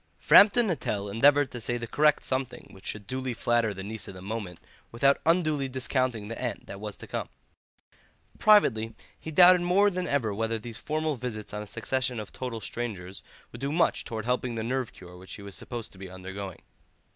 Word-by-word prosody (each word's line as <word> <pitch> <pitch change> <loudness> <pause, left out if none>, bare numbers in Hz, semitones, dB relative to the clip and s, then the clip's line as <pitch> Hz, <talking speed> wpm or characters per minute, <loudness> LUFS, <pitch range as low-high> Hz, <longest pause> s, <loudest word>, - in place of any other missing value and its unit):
Framton 220 +4 +7
Nuttel 105 - -2
endeavoured 140 +5 +4
to 120 - -6
say 120 +2 -1
the 120 - -4
correct 150 +5 +3
something 130 -1 -3
which 95 - -13
should 105 -2 -4
duly 130 +2 -3
flatter 120 -2 +1
the 95 -1 -6
niece 110 +1 -4
of 95 - -8
the 90 - -10
moment 100 -4 -5 0.3
without 135 +4 +3
unduly 155 -5 +2
discounting 130 -4 -1
the 115 - -6
aunt 125 -2 -3
that 100 - -8
was 105 -1 -6
to - - -10
come. - - -4 1.1
Privately 115 - +4 0.2
he - - -7
doubted 180 +3 +7
more 195 +4 +4
than 180 -1 -2
ever 120 -7 0
whether 115 +2 -1
these 110 0 -7
formal 155 0 -1
visits 110 -4 -6
on 105 - -3
a 105 - -8
succession 130 +3 -1
of 105 - -7
total 125 -3 -5
strangers 100 -7 -5 0.3
would 120 - -10
do 140 +1 -1
much 170 +2 +2
towards 110 -1 -5
helping 125 -1 0
the 110 - -2
nerve 125 +1 -2
cure 90 -1 -13
which 95 +1 -9
he 100 - -11
was 100 -1 -9
supposed 120 +1 -6
to 95 - -16
be 95 -1 -8
undergoing. 95 0 -7
120 Hz, 200 wpm, -28 LUFS, 105-140 Hz, 1.1 s, Framton